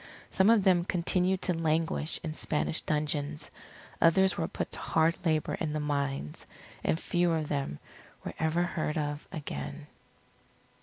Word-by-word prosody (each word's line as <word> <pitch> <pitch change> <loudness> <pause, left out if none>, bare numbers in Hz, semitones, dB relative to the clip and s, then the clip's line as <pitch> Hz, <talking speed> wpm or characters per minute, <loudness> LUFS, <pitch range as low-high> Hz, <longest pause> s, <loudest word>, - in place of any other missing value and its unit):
Some 190 +2 +4
of 225 -3 +5
them 180 -2 +4
continued 180 +1 +1
to 180 - +2
languish 160 0 0
in 155 -2 -3
Spanish 155 0 -1
dungeons, 150 0 -2 0.5
others 190 +3 +5
were 160 - -1
put 195 - -4
to - - -3
hard 160 +1 +2
labour 155 -3 +1
in 155 -2 -1
the 155 - -1
mines, 140 - -2 0.4
and 160 - +1
few 175 -1 +1
of 155 -2 -1
them 140 - -2 0.5
were - - -4
ever 160 +2 +2
heard 160 -3 -2
of 145 -1 -3
again. 70 - -5
160 Hz, 150 wpm, -30 LUFS, 150-175 Hz, 0.5 s, of